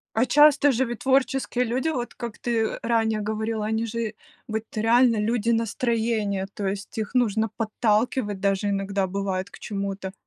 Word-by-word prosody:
А 235 +3 +3
часто 290 +1 +6
же 255 +2 +1
ведь 240 -2 -5
творческие 265 -1 +1
люди, 255 +7 -1
вот 245 -6 -3
как 235 -2 -7
ты 230 -2 -1
ранее 225 -2 +1
говорила, 220 0 -2
они 220 +1 -1
же 230 -1 -3 0.3
вот 220 0 -2
реально 230 +2 +4
люди 230 +1 0
настроения, 225 -3 0
то 200 - -3
есть 200 +3 -4
их 215 +1 -3
нужно 220 -3 +2
подталкивать 215 -1 0
даже 200 +1 +1
иногда 195 0 -1
бывает 190 0 -3
к - - -13
чему-то. 195 -2 -4
220 Hz, 160 wpm, -25 LUFS, 205-240 Hz, 0.3 s, часто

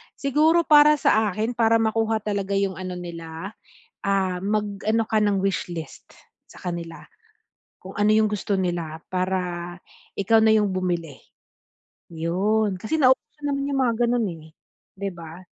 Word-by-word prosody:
siguro 310 +5 +3
para 300 -1 +7
sa 220 -6 +2
akin 215 +5 -2
para 230 -1 +3
makuha 225 -1 +1
talaga 200 -2 -2
yung 195 -2 -1
ano 185 -1 -5
nila, 170 +1 -7 0.5
ah, 195 -2 +1
mag 205 -1 -2
ano 220 +2 +2
ka 220 - 0
ng 205 -2 +2
wish 190 -2 -1
list 160 -4 -9 0.3
sa - - -16
kanila. 170 -2 -5 0.8
Kung 190 - -11
ano 205 0 +3
yung 215 0 +4
gusto 205 -1 -1
nila, 170 -4 -3
para 180 -1 -2 0.4
ikaw 220 +3 +3
na 220 0 +5
yung 210 -2 +1
bumili. 175 -6 -2 0.9
Yun, 185 +4 0
kasi 315 +9 -1
na 260 -4 +6
uso 300 - -32
naman 280 0 -1
yung 275 -1 0
mga 240 -2 +2 0.2
ganun 240 -2 +1 0.2
eh, 160 +1 -16 0.5
'di 200 0 -3
ba? 170 +1 -11
200 Hz, 155 wpm, -24 LUFS, 180-220 Hz, 0.9 s, para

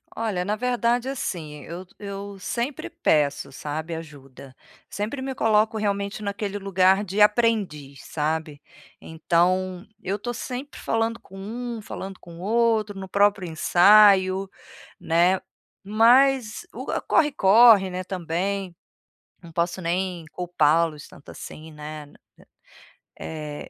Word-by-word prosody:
Olha, 215 -6 -2
na 205 +3 -1
verdade 245 +1 0
assim, 160 - -5
eu 175 +3 -8
eu 200 0 -7
sempre 240 +8 -3
peço, 145 -2 +1
sabe, 155 +4 -5
ajuda. 140 -4 -11 0.4
Sempre 215 +7 -4
me 265 0 -3
coloco 220 -2 +2
realmente 200 0 -2
naquele 200 0 -3
lugar 190 0 +3
de 200 +2 -1
aprendiz, 210 - +1
sabe. 155 -1 -3 0.4
Então, 180 +4 0 0.2
eu 195 +3 -2
tô 240 +4 -4
sempre 255 +3 -6
falando 225 0 -1
com 195 - -15
um, 235 +3 -5
falando 195 -2 -8
com 170 -1 -13
outro, 215 0 +1
no 190 - -7
próprio 200 -1 +2
ensaio, 190 +3 +5 0.5
né. 175 +3 +2 0.4
Mas 240 - +3
o - - -7 0.2
corre-corre, 225 -7 +5
né, 185 0 -4
também, 185 +1 -3 0.7
não 170 - -12
posso 170 +2 -1
nem 175 0 -2
culpar-los 165 -3 +1
tanto 140 - -16
assim, 160 +1 -10
né. 150 -1 -9 1.1
Eh, 150 -2 -7
190 Hz, 115 wpm, -24 LUFS, 165-215 Hz, 1.1 s, ensaio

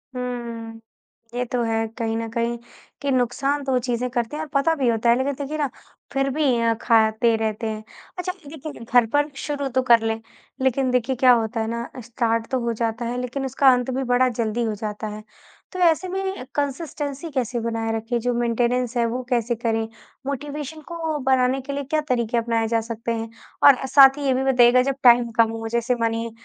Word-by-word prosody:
हुँ। 235 -2 -5 0.5
ये 245 +1 -1
तो 245 -1 0
है 225 -1 0
कहीं 225 -2 -1
न 230 - -3
कहीं, 235 +1 -1 0.4
कि 280 -1 0
नुकसान 275 +3 0
तो 270 - -2
वो 255 - +3
चीज़ें 245 0 -2
करते 240 +2 -2
हैं 315 - -3
और 305 - -9
पता 280 +4 +3
भी 270 -5 0
होता 230 +1 +1
है, 235 - +6
लेकिन 275 +2 0
देखिए 285 +3 -4
ना, 290 -3 0 0.4
फिर 275 0 +1
भी 300 +3 -1 0.2
अ, 230 0 +3
खाते 225 0 +3
रहते 220 0 -2
हैं। 215 0 -4 0.3
अच्छा, 360 0 -2 0.2
लेकिन 305 -5 -8
घर 240 0 +4
पर 290 +1 +2 0.2
शुरू 285 -2 -2
तो 260 - +5
कर 230 -1 +7
लें, 225 0 -1 0.4
लेकिन 260 0 +1
देखिए, 250 +1 +1
क्या 255 0 +5
होता 230 -1 +1
है 220 - -2
ना, 235 +1 -4
स्टार्ट 230 -1 -1
तो 260 - +1
हो 235 - 0
जाता 230 +1 -2
है, 245 +1 -3
लेकिन 255 +2 -3
उसका 265 +1 +4
अंत 250 +1 -1
भी 265 +1 -1
बड़ा 255 +1 +4
जल्दी 225 +1 -1
हो 220 -2 -1
जाता 210 0 -5
है। 215 - -9 0.5
तो 370 - -6
ऐसे 345 +1 +3
में 380 -6 -3
कंसिस्टेंसी 285 +1 -3
कैसे 250 -2 -1
बनाए 225 -1 -1
रखें, 225 +2 -2
जो 245 +1 -1
मेंटेनेंस 240 +1 0
है, 235 - +3
वो 240 +2 -2
कैसे 240 -1 +1
करें? 225 -1 -1 0.4
मोटिवेशन 290 +2 -5
को 325 -3 -3
बढ़ाने 260 0 +2
के 280 +2 -6
लिए 285 0 -3
क्या 305 +3 0
तरीके 235 -2 +1
अपनाए 230 -1 0
जा 230 0 +1
सकते 230 0 -4
हैं? 225 0 -4 0.3
और 280 - +9
ए 265 - -3
साथ 270 +1 +7
ही 290 - -4
ये 265 - +3
भी 260 +1 0
बताइएगा, 250 -1 +5
जब 270 +1 -1
टाइम 240 -1 +6
कम 225 -1 +5
हो, 225 0 -5
जैसे 235 +2 0
मानिए 230 0 -1
245 Hz, 210 wpm, -23 LUFS, 230-275 Hz, 0.5 s, और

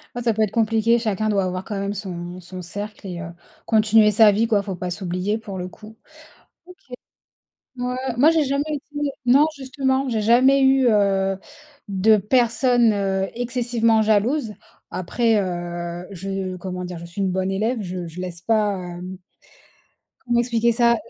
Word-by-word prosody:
Ouais, 245 - -3
ça 230 -1 +2
peut 220 - -1
être 210 - -1
compliqué. 225 +1 +2
Chacun 215 -1 -1
doit 200 -2 +1
avoir, 185 0 -3
quand 205 0 -5
même, 200 +1 -2
son 180 -3 -6
son 180 +1 -9
cercle 205 +4 -7
et 175 -2 -6
heu, 160 - -6 0.4
continuer 215 -1 +4
sa 215 0 +6
vie, 220 +3 +1
quoi. 210 -3 +2
Faut 195 -2 -5
pas 180 0 -4
s'oublier 185 +3 -2
pour 205 -4 -8
le 180 0 -4
coup. 215 +4 -14 1.8
OK. 245 - -3
Ouais. 250 0 -2 0.2
Moi, 285 +6 +6
j'ai 325 -2 +2
jamais 280 +1 0
été 290 0 -3 0.2
non, 275 +5 +6
justement, 265 0 -1
j'ai 225 -3 -1
jamais 260 +5 +5
eu, 265 -1 +4
heu, 195 -3 +2 0.5
de 200 +3 +4
personne, 235 +2 +3
heu, 195 -1 -1
excessivement 240 -2 +1
jalouse. 220 +2 +1 0.4
Après, 225 +5 0
heu, 175 -1 -5
je 195 0 -4
comment 180 0 -5
dire? 180 -1 -6
Je 170 - -9
suis 170 +4 -8
une 190 -1 +1
bonne 190 +1 -1
élève, 220 +5 -1
je 180 -2 -5
je 165 +2 -8
laisse 180 -2 -6
pas, 210 -1 +1
hem, 180 +1 -7 1.1
comment 240 -1 +2
expliquer 235 -1 +1
ça? 235 0 +3
210 Hz, 170 wpm, -22 LUFS, 185-235 Hz, 1.8 s, sa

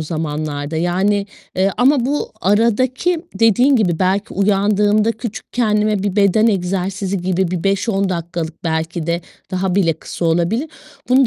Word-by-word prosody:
zamanlarda 155 -1 -3
yani, 190 +4 +1 0.3
eee, 190 +1 +2
ama 260 0 +3
bu 290 +2 -2
aradaki 255 - +1
dediğin 225 +6 +4
gibi 180 -8 +1
belki 190 +2 0
uyandığımda 205 +2 +2
küçük 220 -4 -7
kendime 210 -3 +1
bir 200 -1 -2
beden 205 +2 +4
egzersizi 195 -1 -1
gibi 185 0 0
bir 180 -2 -3
5-10 195 0 +1
dakikalık 170 -2 -4
belki 160 0 -2
de 170 0 0 0.3
daha 185 0 -1
bile 185 -4 +3
kısa 165 - -7
olabilir. 175 - +1 0.4
Bunu 260 +1 +5
195 Hz, 140 wpm, -18 LUFS, 175-215 Hz, 0.4 s, Bunu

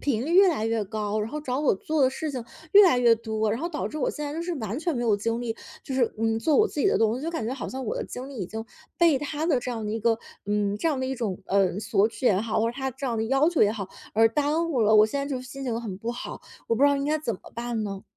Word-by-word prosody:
频 255 -4 0
率 330 - -2
越 385 +1 +7
来 285 -11 0
越 225 -1 0
高， 210 +1 -2
然 210 - -2
后 300 - -4
找 255 -3 -2
我 290 - +3
做 310 +10 -2
的 260 - +5
事 310 +3 -4
情 255 -4 -4 0.3
越 410 +1 +10
来 335 - +4
越 235 -2 +6
多， 220 -1 -1
然 225 +6 -2
后 340 - -2
导 310 -3 -3
致 305 - -6
我 280 - +1
现 300 - -5
在 290 - -4
就 320 - -4
是 350 0 -3
完 225 -3 -4
全 330 -4 -1
没 240 - -1
有 225 -3 +3
精 230 +3 -2
力， 225 -2 -2 0.3
就 265 - -4
是， 250 -3 +1
嗯， 225 0 +1
做 305 +5 +2
我 435 - +5
自 295 - -4
己 - - +3
的 395 - +3
东 225 +1 +2
西， 265 - -6
就 330 - -2
感 225 -10 -3
觉 250 - -2
好 270 - -5
像 265 0 -5
我 215 - -2
的 - - -2
精 255 +1 -7
力 275 - -9
已 185 - -3
经 220 +4 -6 0.3
被 330 -5 +4
他 295 +2 -3
的 280 -7 +2
这 250 - -4
样 225 -3 -4
的 210 - -3
一 225 - -2
个 225 +1 +2 0.3
嗯， 205 -1 0
这 330 - +1
样 290 - 0
的 - - -1
一 265 - -2
种， 215 -7 -3
呃， 195 -1 +2
索 205 0 +2
取 255 - -9
也 195 -4 +4
好， 220 0 -1
或 230 - +1
者 - - -10
他 265 -1 -2
这 265 +2 -6
样 235 -3 -1
的 220 - 0
要 270 +6 +3
求 345 - +3
也 205 - +4
好， 200 -4 -5 0.3
而 225 +1 +6
耽 300 +7 0
误 260 -7 0
了。 215 0 +4
我 215 - +8
现 280 +6 -2
在 280 - -3
就 270 -3 -3
是 - - -11
心 270 +1 -7
情 235 -3 -1
很 200 -5 -6
不 225 +3 -3
好， 240 - -7 0.3
我 230 - +3
不 230 - 0
知 285 - +7
道 285 - +2
应 275 - -2
该 305 +2 +1
怎 265 -7 -2
么 - - -13
办 235 -1 -3
呢？ 195 -2 -5
240 Hz, 355 characters per minute, -26 LUFS, 220-290 Hz, 0.3 s, 越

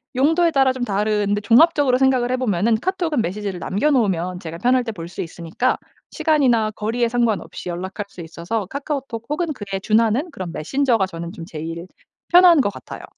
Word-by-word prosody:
용도에 325 +6 +3
따라 270 -3 +3
좀 255 -1 -4
다른데 205 -1 0
종합적으로 265 +3 +4
생각을 260 -2 +2
해 - - +2
보면은 220 -2 +1
카톡은 340 - -1
메시지를 195 0 -4
남겨 205 +11 0
놓으면 185 - 0
제가 165 0 -7
편할 250 +4 +2
때 230 - -4
볼 170 -6 -8
수 - - -6
있으니까 170 +9 -2 0.3
시간이나 250 -9 +2
거리에 225 +3 -1
상관없이 230 -6 -1
연락할 190 +4 -5
수 - - -16
있어서 170 +6 -4
카카오톡 275 -3 -5
혹은 335 +4 -1
그에 200 -6 -5
준하는 225 - +2
그런 185 -10 -6
메신저가 235 - +1
저는 170 -2 -7
좀 165 - -8
제일 165 +1 -7 0.4
편한 350 -2 +7
것 205 - 0
같아요. - - -10
225 Hz, 410 characters per minute, -21 LUFS, 190-265 Hz, 0.4 s, 편한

